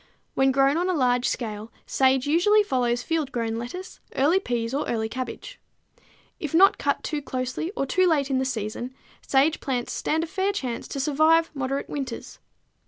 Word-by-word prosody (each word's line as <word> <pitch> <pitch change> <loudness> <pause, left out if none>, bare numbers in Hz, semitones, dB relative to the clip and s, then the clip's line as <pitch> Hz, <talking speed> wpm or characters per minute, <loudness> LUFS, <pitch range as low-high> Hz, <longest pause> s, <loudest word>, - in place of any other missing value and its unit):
When 270 0 +3
grown 275 +3 +3
on 355 +2 0
a 365 - +1
large 250 -3 +2
scale, 220 -1 -4
sage 265 -1 +2
usually 365 +8 +4
follows 245 -8 0
field 315 -4 -1
grown 230 -2 -2
lettuce, 300 +11 -7 0.2
early 305 +8 +3
peas 235 -8 -2
or 285 - -1
early 220 -2 0
cabbage. 255 - -6 0.8
If 305 0 -3
not 390 +4 +6
cut - - 0
too 300 -2 -2
closely 255 +4 -3
or 275 - +1
too 370 +7 +2
late 285 -5 +1
in 260 - +2
the - - +1
season 245 0 -4 0.3
sage 280 +4 +2
plants 250 -3 -2
stand 320 +1 0
a - - -1
fair 390 +4 -1
chance 255 -11 -4
to 280 - -5
survive 310 +4 +3
moderate 275 0 -2
winters. 275 -2 -6
270 Hz, 175 wpm, -25 LUFS, 250-320 Hz, 0.8 s, not